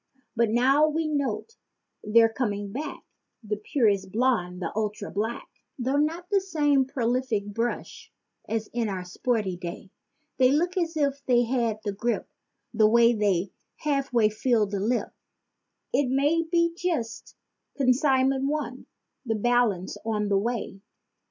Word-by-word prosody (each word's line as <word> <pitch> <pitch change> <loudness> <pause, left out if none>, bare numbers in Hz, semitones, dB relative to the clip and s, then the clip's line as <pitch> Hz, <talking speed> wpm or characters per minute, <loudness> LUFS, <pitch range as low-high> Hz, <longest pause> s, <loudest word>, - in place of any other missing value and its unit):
But 235 -1 +2
now 265 +7 +4
we 315 +1 -1
note 285 - -2 0.5
they're 225 +2 +5
coming 205 -5 -2
back—the 220 -4 -7
purest 205 -4 +1
blonde 205 -6 0
and 165 - -2
ultra 210 -1 -3
black— 220 +4 -3 0.3
Though 265 +2 0
not 325 +4 0
the 400 -1 +3
same 295 -7 +2
prolific 250 -4 -1
brush 230 +4 -4 0.4
as 220 -1 -1
in 230 -2 0
our 185 -2 -4
sporty 205 0 -1
day. 175 +1 -8 0.5
They 255 -1 +5
look 345 +6 +1
as 335 -3 -1
if 280 -2 0
they 245 -1 +4
had 230 -3 -1
the 205 -2 -2
grippe, 235 +4 -2 0.5
the 215 -1 +4
way 235 +1 +5
they 200 -4 0 0.2
half 275 -3 -1
way 230 -3 +4
fill 220 0 +1
the 200 0 -3
lip— 235 +5 -1 0.8
It 280 -3 +2
may 285 +5 +2
be 335 -1 +2
just 320 -11 -3 0.4
"consignment 265 0 +2
one," 285 -4 -4 0.4
the 225 -4 -1
balance 220 -4 +1
on 210 -2 -1
the 200 - +3
way. 220 -3 -3
240 Hz, 140 wpm, -26 LUFS, 210-275 Hz, 0.8 s, they're